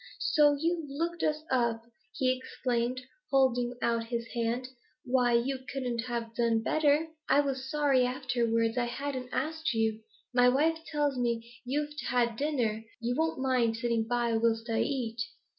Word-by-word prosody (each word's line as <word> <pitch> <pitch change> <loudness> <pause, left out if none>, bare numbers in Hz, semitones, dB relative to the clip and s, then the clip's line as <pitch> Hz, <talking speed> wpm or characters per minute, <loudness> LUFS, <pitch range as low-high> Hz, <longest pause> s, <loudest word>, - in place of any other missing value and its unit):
'So 295 -2 +4
you've 330 -1 -1
looked 335 +4 -2
us 305 0 0
up!' 235 -3 +1 0.3
he 255 +1 +2
exclaimed, 250 -1 -2 0.3
holding 250 -3 +2
out 230 -1 +1
his 235 0 -3
hand. 235 +2 -1 0.4
'Why, 245 -1 +3
you 260 +3 +1
couldn't 245 -3 -2
have 235 -2 -4
done 230 -2 +2
better; 310 +4 +2 0.2
I 285 - +6
was 265 -2 -3
sorry 285 -3 +3
afterwards 245 -2 0
I 240 - +1
hadn't 260 0 -4
asked 315 -6 -1
you. 220 -1 0 0.3
My 245 0 +6
wife 315 +5 +2
tells 290 -3 0
me 235 -1 -1
you've 295 +3 -1
had 235 -2 +1
dinner; 235 -6 -1 0.2
you 240 +1 -1
won't 320 +2 0
mind 245 -4 +2
sitting 230 -1 0
by 240 -1 +1
whilst 225 0 +1
I 225 - +1
eat? 235 -4 -2
250 Hz, 155 wpm, -30 LUFS, 235-280 Hz, 0.4 s, I